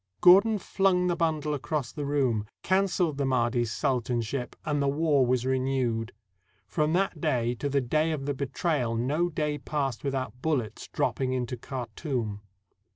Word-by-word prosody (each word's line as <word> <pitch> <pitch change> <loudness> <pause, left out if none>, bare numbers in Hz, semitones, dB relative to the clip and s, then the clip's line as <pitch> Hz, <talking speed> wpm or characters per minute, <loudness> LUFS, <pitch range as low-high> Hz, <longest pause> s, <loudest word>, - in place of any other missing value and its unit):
Gordon 200 +5 +7
flung 190 -1 +1
the 175 -1 +1
bundle 155 -3 0
across 145 -2 -2
the 145 -2 -4
room, 125 -7 +1 0.2
canceled 185 -5 +1
the 140 - +1
Mahdi's 120 -2 +1
sultanship, 125 0 -1
and 145 -2 0
the 140 - +1
war 145 -2 +3
was 125 0 +1
renewed. 130 -3 0 0.5
From 155 0 0
that 180 -4 0
day 120 -7 +1
to 145 - -1
the 140 0 +2
day 155 +6 +1
of 145 -3 -3
the 145 - 0
betrayal 135 -2 -1
no 145 +9 +1
day 150 -2 -2
passed 135 -4 -2
with 140 -1 -1
out 130 -1 -4
bullets 135 -9 -2
dropping 130 -1 -1
into 125 -1 -2
Khartoum. 120 -3 -4
140 Hz, 155 wpm, -28 LUFS, 125-155 Hz, 0.5 s, Gordon